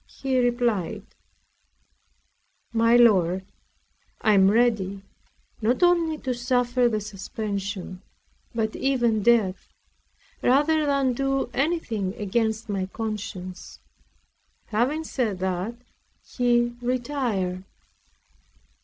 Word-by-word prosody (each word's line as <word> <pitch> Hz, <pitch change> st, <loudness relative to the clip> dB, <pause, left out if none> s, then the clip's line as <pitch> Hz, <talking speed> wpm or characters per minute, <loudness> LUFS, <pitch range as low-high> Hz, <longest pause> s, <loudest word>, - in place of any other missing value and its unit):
He 265 Hz, -2 st, -1 dB
replied: 240 Hz, -7 st, 0 dB, 1.7 s
"My 230 Hz, +1 st, +4 dB
lord, 190 Hz, -6 st, +4 dB, 0.8 s
I 215 Hz, -, +4 dB
am 195 Hz, -1 st, +6 dB
ready, 205 Hz, -4 st, +1 dB, 0.6 s
not 240 Hz, +10 st, +1 dB
only 340 Hz, -3 st, +3 dB
to 260 Hz, -3 st, -3 dB
suffer 245 Hz, 0 st, +1 dB
the 215 Hz, -2 st, -1 dB
suspension, 200 Hz, -2 st, -5 dB, 0.5 s
but 220 Hz, -1 st, -1 dB
even 240 Hz, -5 st, +1 dB
death, 210 Hz, -4 st, +2 dB, 0.7 s
rather 295 Hz, +4 st, +3 dB
than 275 Hz, -2 st, +2 dB
do 270 Hz, 0 st, -1 dB
anything 245 Hz, -, -1 dB
against 220 Hz, +1 st, -1 dB
my 195 Hz, -3 st, -2 dB
conscience." 200 Hz, -4 st, -6 dB, 0.9 s
Having 250 Hz, +9 st, 0 dB
said 235 Hz, -10 st, -2 dB
that, 185 Hz, +4 st, -2 dB, 0.5 s
he 240 Hz, -1 st, +1 dB
retired. 240 Hz, -8 st, -2 dB
230 Hz, 90 wpm, -25 LUFS, 200-250 Hz, 1.7 s, am